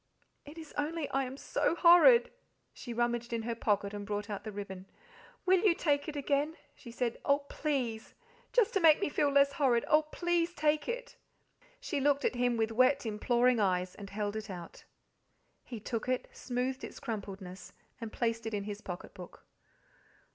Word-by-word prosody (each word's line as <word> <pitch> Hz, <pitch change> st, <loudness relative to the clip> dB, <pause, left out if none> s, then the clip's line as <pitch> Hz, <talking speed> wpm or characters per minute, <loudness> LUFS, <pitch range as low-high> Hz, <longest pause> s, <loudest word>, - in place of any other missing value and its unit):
It 295 Hz, +3 st, -12 dB
is 320 Hz, -2 st, -10 dB
only 305 Hz, 0 st, -2 dB
I 270 Hz, 0 st, +1 dB
am 260 Hz, +1 st, -7 dB
so 325 Hz, -, 0 dB
horrid." 355 Hz, +8 st, +7 dB, 0.4 s
She 240 Hz, -, -8 dB
rummaged 240 Hz, 0 st, -1 dB
in 230 Hz, -1 st, -2 dB
her 235 Hz, +1 st, -2 dB
pocket 205 Hz, -3 st, 0 dB
and 205 Hz, 0 st, -5 dB
brought 205 Hz, 0 st, -4 dB
out 205 Hz, 0 st, -5 dB
the 215 Hz, -, -6 dB
ribbon. 195 Hz, -2 st, -7 dB, 0.6 s
"Will 375 Hz, 0 st, +5 dB
you 375 Hz, -3 st, +3 dB
take 285 Hz, -4 st, 0 dB
it 300 Hz, -, -7 dB
again?" 290 Hz, +2 st, 0 dB, 0.2 s
she 245 Hz, -, -13 dB
said 235 Hz, 0 st, -2 dB
"oh, 280 Hz, 0 st, +2 dB
PLEASE, 250 Hz, -7 st, -2 dB, 0.4 s
just 485 Hz, -2 st, +3 dB
to 390 Hz, -, +2 dB
make 320 Hz, -4 st, +6 dB
me 395 Hz, -, 0 dB
feel 290 Hz, 0 st, +1 dB
less 280 Hz, 0 st, +4 dB
horrid. 255 Hz, -5 st, +2 dB
Oh, 305 Hz, 0 st, +5 dB
please 345 Hz, +2 st, -1 dB
take 300 Hz, +3 st, +1 dB
it!" -, -, -5 dB, 0.6 s
She 300 Hz, -, -3 dB
looked 285 Hz, +1 st, +2 dB
at -, -, +2 dB
him 245 Hz, -1 st, +1 dB
with 225 Hz, 0 st, 0 dB
wet, 255 Hz, +4 st, +3 dB
imploring 240 Hz, +3 st, +2 dB
eyes, 185 Hz, -2 st, +1 dB
and 200 Hz, -1 st, -10 dB
held 205 Hz, +1 st, -3 dB
it 220 Hz, 0 st, -5 dB
out. 175 Hz, -3 st, -9 dB, 0.8 s
He 235 Hz, -, -8 dB
took 230 Hz, +3 st, -4 dB
it, 255 Hz, -1 st, -1 dB
smoothed 255 Hz, +1 st, -3 dB
its -, -, -8 dB
crumpledness, 195 Hz, -5 st, -7 dB, 0.3 s
and 225 Hz, -1 st, -5 dB
placed 230 Hz, -1 st, -2 dB
it 225 Hz, -, -2 dB
in 200 Hz, -, -2 dB
his 205 Hz, 0 st, -6 dB
pocket 180 Hz, -4 st, -7 dB
book. 180 Hz, -3 st, -12 dB
245 Hz, 185 wpm, -31 LUFS, 215-295 Hz, 0.8 s, horrid